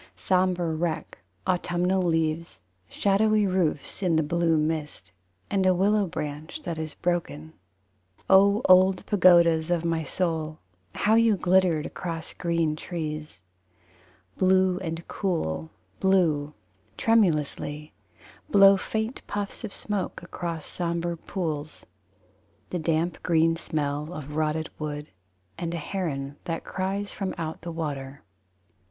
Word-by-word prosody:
Sombre 180 Hz, -3 st, +1 dB
wreck 160 Hz, -4 st, -3 dB, 0.3 s
autumnal 180 Hz, +1 st, +1 dB
leaves; 165 Hz, -, -1 dB, 0.3 s
Shadowy 210 Hz, +1 st, +2 dB
roofs 180 Hz, -4 st, -1 dB
In 180 Hz, -4 st, +2 dB
the 160 Hz, -, +3 dB
blue 165 Hz, +1 st, +2 dB
mist, 155 Hz, -, -2 dB, 0.4 s
And 195 Hz, -1 st, +2 dB
a 185 Hz, -1 st, +4 dB
willow 200 Hz, +2 st, +2 dB
branch 155 Hz, -, -6 dB
that 165 Hz, -, -4 dB
is 155 Hz, -1 st, -5 dB
broken. 160 Hz, -3 st, -2 dB, 0.7 s
O 200 Hz, +4 st, +5 dB
old 185 Hz, 0 st, +5 dB
pagodas 170 Hz, -4 st, +5 dB
of 170 Hz, -1 st, 0 dB
my 165 Hz, -1 st, 0 dB
soul, 160 Hz, -1 st, -2 dB, 0.4 s
how 215 Hz, -, +2 dB
you 225 Hz, -2 st, +4 dB
glittered 180 Hz, -4 st, +3 dB
across 165 Hz, -3 st, -5 dB
green 170 Hz, -3 st, 0 dB
trees! 155 Hz, -, -5 dB, 1.0 s
Blue 185 Hz, -1 st, +3 dB
and 165 Hz, -2 st, -5 dB
cool: 80 Hz, -, -2 dB, 0.3 s
Blue, 160 Hz, -6 st, +2 dB, 0.4 s
tremulously, 150 Hz, -8 st, +1 dB, 0.6 s
Blow 195 Hz, -4 st, +7 dB
faint 220 Hz, +5 st, -3 dB
puffs 205 Hz, +3 st, -4 dB
of 220 Hz, -, -5 dB
smoke 200 Hz, -5 st, -3 dB
Across 170 Hz, -3 st, -5 dB
sombre 170 Hz, 0 st, -2 dB
pools. 155 Hz, -4 st, -5 dB, 0.9 s
The 180 Hz, -, -1 dB
damp 165 Hz, +2 st, 0 dB
green 165 Hz, -1 st, +3 dB
smell 150 Hz, -1 st, -2 dB
of 150 Hz, -2 st, -7 dB
rotted 155 Hz, 0 st, -1 dB
wood; 150 Hz, -1 st, -5 dB, 0.5 s
And 170 Hz, -1 st, -3 dB
a -, -, -2 dB
heron 150 Hz, -5 st, -4 dB
that 165 Hz, -1 st, -3 dB
cries 195 Hz, +2 st, -3 dB
from 195 Hz, -2 st, -3 dB
out 160 Hz, -2 st, -4 dB
the 170 Hz, -, -6 dB
water. 145 Hz, -4 st, -5 dB
170 Hz, 120 wpm, -26 LUFS, 155-185 Hz, 1.0 s, Blow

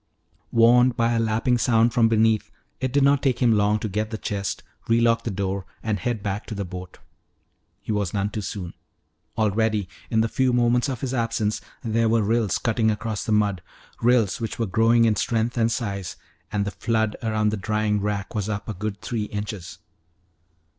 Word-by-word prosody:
Warned 120 Hz, +1 st, +5 dB
by 115 Hz, 0 st, +2 dB
a 115 Hz, -, +1 dB
lapping 115 Hz, +2 st, +1 dB
sound 115 Hz, -1 st, +3 dB
from 115 Hz, -2 st, +4 dB
beneath, 110 Hz, -1 st, +2 dB, 0.3 s
it 130 Hz, -1 st, -1 dB
did 140 Hz, +1 st, +3 dB
not 140 Hz, 0 st, +4 dB
take 130 Hz, -4 st, +1 dB
him 120 Hz, -2 st, +3 dB
long 105 Hz, 0 st, +3 dB
to 110 Hz, -, -3 dB
get 105 Hz, +2 st, -2 dB
the 110 Hz, -, -4 dB
chest, 100 Hz, -2 st, -3 dB, 0.3 s
relock 115 Hz, 0 st, +3 dB
the -, -, -2 dB
door, 100 Hz, -1 st, -3 dB, 0.2 s
and 110 Hz, -3 st, -1 dB
head 110 Hz, +1 st, -2 dB
back 100 Hz, +1 st, -3 dB
to 110 Hz, -, -5 dB
the 100 Hz, -1 st, -3 dB
boat. 90 Hz, 0 st, -8 dB, 0.8 s
He -, -, -4 dB
was 100 Hz, -4 st, 0 dB
none 100 Hz, 0 st, -1 dB
too 105 Hz, -, -3 dB
soon. 95 Hz, -3 st, -5 dB, 0.6 s
Already, 110 Hz, -1 st, +1 dB, 0.2 s
in 110 Hz, -1 st, +2 dB
the 115 Hz, -, +2 dB
few 130 Hz, +2 st, +1 dB
moments 120 Hz, +2 st, +2 dB
of 130 Hz, -4 st, -4 dB
his 130 Hz, -1 st, -2 dB
absence, 115 Hz, -3 st, -1 dB, 0.2 s
there 115 Hz, 0 st, +1 dB
were 115 Hz, -1 st, +3 dB
rills 110 Hz, -2 st, +1 dB
cutting 115 Hz, -2 st, +1 dB
across 110 Hz, 0 st, -2 dB
the -, -, -3 dB
mud, 105 Hz, -4 st, +2 dB, 0.4 s
rills 115 Hz, -3 st, +2 dB
which 115 Hz, -, -3 dB
were 115 Hz, -, 0 dB
growing 115 Hz, +4 st, +3 dB
in 110 Hz, -2 st, +3 dB
strength 115 Hz, +3 st, 0 dB
and 115 Hz, -1 st, +2 dB
size. 100 Hz, -6 st, -3 dB, 0.4 s
And 100 Hz, -1 st, 0 dB
the 100 Hz, -, -3 dB
flood 110 Hz, +2 st, 0 dB
around 110 Hz, -2 st, +1 dB
the 105 Hz, -, -2 dB
drying 105 Hz, 0 st, 0 dB
rack 105 Hz, 0 st, -3 dB
was 105 Hz, -2 st, -2 dB
up 105 Hz, -1 st, -4 dB
a 110 Hz, -, -3 dB
good 100 Hz, 0 st, -5 dB
three 110 Hz, -3 st, -2 dB
inches. 105 Hz, -3 st, -6 dB
110 Hz, 195 wpm, -24 LUFS, 105-115 Hz, 0.8 s, Warned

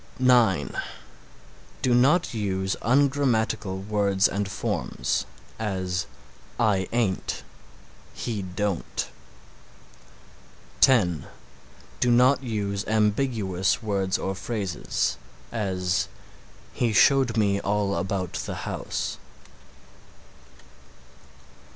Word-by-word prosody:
(9) 120 Hz, -, +3 dB, 1.1 s
Do 130 Hz, -2 st, +3 dB
not 135 Hz, +6 st, +4 dB
use 95 Hz, -3 st, -1 dB
ungrammatical 115 Hz, -7 st, +1 dB
words 100 Hz, -1 st, +2 dB
and 100 Hz, 0 st, -2 dB
forms; 65 Hz, -8 st, -2 dB, 0.3 s
as, 95 Hz, -3 st, -2 dB, 0.5 s
"I 100 Hz, -5 st, +2 dB
ain't;" 115 Hz, -6 st, -1 dB, 0.7 s
"he 110 Hz, -4 st, -3 dB
don't." 95 Hz, 0 st, -3 dB, 1.7 s
(10) 90 Hz, -, +4 dB, 0.7 s
Do 125 Hz, -, +2 dB
not 125 Hz, +3 st, +5 dB
use 105 Hz, -5 st, -2 dB
ambiguous 105 Hz, -3 st, +1 dB
words 100 Hz, -3 st, 0 dB
or 95 Hz, -, -2 dB
phrases; 95 Hz, -5 st, -2 dB, 0.3 s
as 95 Hz, -5 st, 0 dB, 0.7 s
"He 115 Hz, -3 st, 0 dB
showed 130 Hz, 0 st, +4 dB
me 100 Hz, -2 st, +2 dB
all 100 Hz, 0 st, 0 dB
about 95 Hz, -2 st, -2 dB
the -, -, -4 dB
house." -, -, -3 dB
105 Hz, 80 wpm, -26 LUFS, 95-120 Hz, 1.7 s, not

